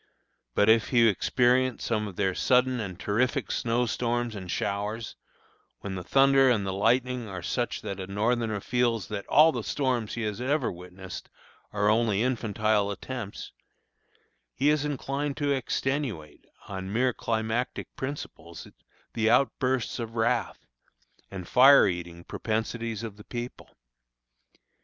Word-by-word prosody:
But 105 - +4
if 110 0 +5
he 120 -3 +5
experience 125 +4 +2
some 105 -2 0
of 95 - -9
their 95 -1 0
sudden 125 +4 +2
and 95 -4 -5
terrific 125 +6 0
snow 120 0 0
storms 120 0 -1
and 95 -4 -7
showers, 105 +5 -3 0.7
when 100 - -5
the 90 -1 -5
thunder 135 +5 +5
and 110 -5 +2
the 95 - -2
lightning 120 +3 +1
are 95 -3 -6
such - - -2
that 100 0 -5
a 95 - -5
Northerner 110 +1 0
feels 120 -3 0
that 100 -2 -5
all 160 +2 +6
the - - -4
storms 125 -6 -1
he 120 - -3
has 105 +2 -3
ever 135 0 0
witnessed 90 +1 -9 0.4
are 105 0 0
only 110 -1 +2
infantile 110 -4 +1
attempts, 110 0 -6 1.0
he 140 +3 +2
is 150 -1 +1
inclined 140 0 -3
to 145 -2 0
extenuate, 135 - -2 0.2
on 95 -1 -5
mere 125 +3 +2
climactic 110 +2 -2
principles, 85 - -7 0.5
the 110 -1 +1
outbursts 130 -2 +1
of 115 -1 -5
wrath, 115 -1 0 0.6
and 95 -3 -7
"fire 135 +3 +7
eating" 85 -2 -4
propensities 115 +1 -3
of 110 -3 -7
the 105 - -12
people. 120 0 -7
115 Hz, 140 wpm, -27 LUFS, 100-125 Hz, 1.0 s, fire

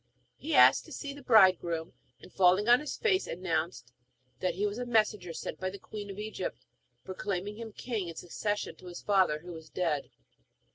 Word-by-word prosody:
He 315 +2 -3
asked - - +7
to - - -14
see 280 -2 -5
the 285 - -11
bridegroom, 185 -8 +4 0.3
and - - -15
falling 190 +3 +4
on 245 +1 +7
his 300 - -5
face 400 -4 +1
announced 165 -7 -3 0.5
that 180 -2 -1
he 200 +3 0
was 205 +3 -2
a 250 - -3
messenger 215 -6 +1
sent - - -6
by 185 - -2
the 195 - -8
queen 205 +1 -8
of 195 - -7
Egypt, 215 +1 -5 0.4
proclaiming 195 +1 -4
him 225 -1 -7
king 215 -4 -4
in 165 - -7
succession 205 +5 -3
to 185 - -13
his 175 -1 -8
father, 185 -7 +3
who 175 +1 -9
was 160 -2 -10
dead. 160 -6 -1
195 Hz, 190 wpm, -30 LUFS, 175-220 Hz, 0.5 s, asked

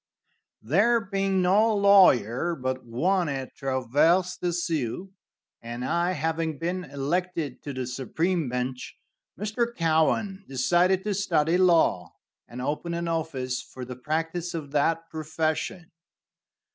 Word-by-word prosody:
There 205 - +3
being 195 -2 0
no 210 +5 +4
lawyer 175 - +4
but 130 -2 -3
one 170 +9 0
at 135 -2 -4
Traverse 145 +8 +1
des 175 -1 -2
Sioux, 170 +1 -2 0.5
and 120 +2 -5
I 170 +4 +1
having 160 0 -2
been 180 +4 -3
elected 150 +1 -3
to 145 - -6
the 130 -1 -4
supreme 155 +5 -1
bench, 125 +1 -4 0.4
Mr. 215 +3 0
Cowan 170 +5 +1
decided 175 +9 +2
to 210 0 -1
study 170 -4 +1
law, 170 - +3 0.3
and 125 +1 -7
open 160 +5 -2
an 170 0 -3
office 150 -6 -2
for 130 -1 -9
the 125 0 -7
practice 165 +6 -3
of 145 -4 -6
that 165 +3 +1
profession. 160 +2 -3
165 Hz, 125 wpm, -26 LUFS, 135-180 Hz, 0.5 s, no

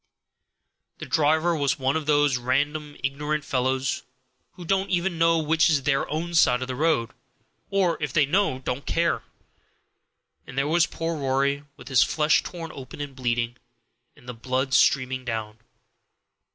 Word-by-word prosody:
The - - -7
driver 160 +3 +2
was 140 -2 0
one 135 +1 0
of 155 -2 -2
those 145 -3 +3
random, 145 +4 -1
ignorant 150 +2 -2
fellows, 130 0 0 0.5
who 175 - -10
don't 195 +2 0
even 175 -1 0
know 165 0 +4
which 160 +1 +3
is 145 -4 +2
their 135 0 0
own 165 +3 -3
side 130 -6 +4
of - - -6
the 130 - -3
road, 150 -6 +1 0.6
or, 185 -4 +1
if 150 -3 -2
they 150 0 +3
know, 180 -2 +1
don't 130 +1 -5
care. 170 0 +1 1.3
And 125 - -10
there 135 +1 +1
was 170 +2 +3
poor 165 0 -3
Rory 140 0 0
with - - -13
his 130 -3 +4
flesh 150 0 +3
torn 165 -2 -7
open 135 +1 -10
and 145 -2 -6
bleeding, 120 -2 -1 0.6
and 120 - -20
the 125 - -5
blood 130 +3 -2
streaming 130 -1 +3
down. 110 -3 -4
145 Hz, 160 wpm, -25 LUFS, 130-160 Hz, 1.3 s, know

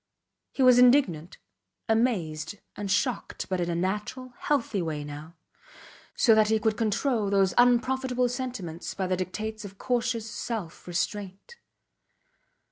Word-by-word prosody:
He 270 - 0
was 250 -1 +7
indignant, 240 - +3 0.5
amazed 205 -8 0 0.2
and 205 -1 -5
shocked, 235 +6 -1
but 185 -1 -1
in 175 - -1
a 170 - -1
natural, 210 +8 -3
healthy 235 -9 0
way 155 -3 -3
now; 150 +3 -9 0.8
so 230 - +5
that 215 -1 +4
he 220 +1 +3
could 215 0 0
control 225 0 0
those 195 -2 +3
unprofitable 250 +1 +3
sentiments 240 -10 -5
by 190 - -2
the 185 0 0
dictates 215 +4 -4
of 195 -1 -10
cautious 235 -2 -1
self 210 -6 -5
restraint. 195 - -4
215 Hz, 130 wpm, -27 LUFS, 185-245 Hz, 0.8 s, was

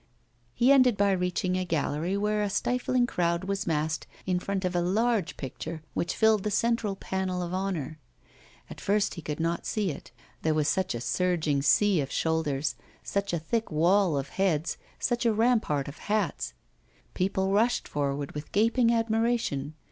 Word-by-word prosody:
He 250 +3 +4
ended 255 -5 +5
by 200 0 +3
reaching 180 0 0
a 185 - 0
gallery 165 +2 -1
where 210 +1 0
a 205 - 0
stifling 245 +4 +1
crowd 170 -7 0
was 195 0 -2
massed 155 -1 -1 0.2
in 180 -1 +1
front 195 0 -2
of 180 0 -1
a 175 - +2
large 210 +2 +1
picture 155 +4 -6
which 170 - -1
filled 220 -2 +4
the 210 - -1
central 230 -1 +1
panel 190 -1 -2
of 175 +1 -5
honour. 180 -6 -3 0.7
At - - -10
first 205 +1 +1
he 170 - -7
could 150 0 -4
not 165 +1 -1
see 205 -5 0
it, 140 - -9 0.3
there 160 -1 +1
was 150 -1 +1
such 185 -6 0
a 115 - -4
surging 160 -2 +1
sea 185 +5 +4
of 135 - -5
shoulders, 160 -3 0 0.3
such 200 0 -2
a 170 - 0
thick 220 +8 -2
wall 170 +1 +3
of 140 0 -3
heads, 175 -5 0 0.2
such 240 0 -1
a 230 - +4
rampart 220 - +2
of 140 - -9
hats. 210 0 -1 0.6
People 190 +1 0
rushed 225 +5 +2
forward 140 -1 -2
with 150 +1 -7
gaping 230 +3 +3
admiration. 225 - 0
185 Hz, 170 wpm, -28 LUFS, 160-210 Hz, 0.7 s, ended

